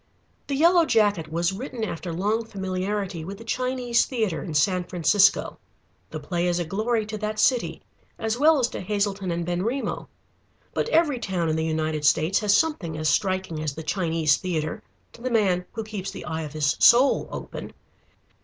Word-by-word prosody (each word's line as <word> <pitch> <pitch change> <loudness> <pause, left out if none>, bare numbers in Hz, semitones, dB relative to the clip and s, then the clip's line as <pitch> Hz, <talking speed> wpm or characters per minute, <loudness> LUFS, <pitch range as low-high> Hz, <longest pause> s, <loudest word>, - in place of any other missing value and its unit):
The 280 - -1
Yellow 340 +4 +5
Jacket 205 - +2
was 170 +3 0
written 240 +2 -5
after 175 -4 -4
long 205 +7 0
familiarity 190 -3 -3
with 195 +4 -7
the 225 - -11
Chinese 250 0 0
Theatre 220 - -2
in 160 - -6
San 180 +5 +2
Francisco. 190 +3 +2 0.5
The - - -6
play 175 0 -2
is 175 -1 +1
a 175 - -1
glory 220 +5 -1
to 215 0 -6
that 215 0 -3
city 245 +2 +1 0.3
as 225 0 -1
well 310 +2 +5
as 250 -3 +2
to - - -6
Hazelton 200 -1 -1
and 170 0 -2
Benrimo. 190 +10 -2 0.7
But - - -1
every 315 - +2
town 180 -7 -1
in 155 - +1
the 160 - 0
United 155 -1 -1
States 160 +5 +3
has 210 -1 +3
something 200 - -1
as 155 0 0
striking 185 -2 0
as 150 -3 -3
the 160 - -6
Chinese 160 -4 +1
Theatre, 160 -4 -3 0.3
to - - -15
the 255 - -2
man 190 -6 +2
who 225 - -4
keeps 205 -3 -5
the - - -8
eye 160 0 -3
of 150 -2 -7
his 150 -2 +1
soul 255 +4 +5
open. - - -7
195 Hz, 180 wpm, -25 LUFS, 165-225 Hz, 0.7 s, Yellow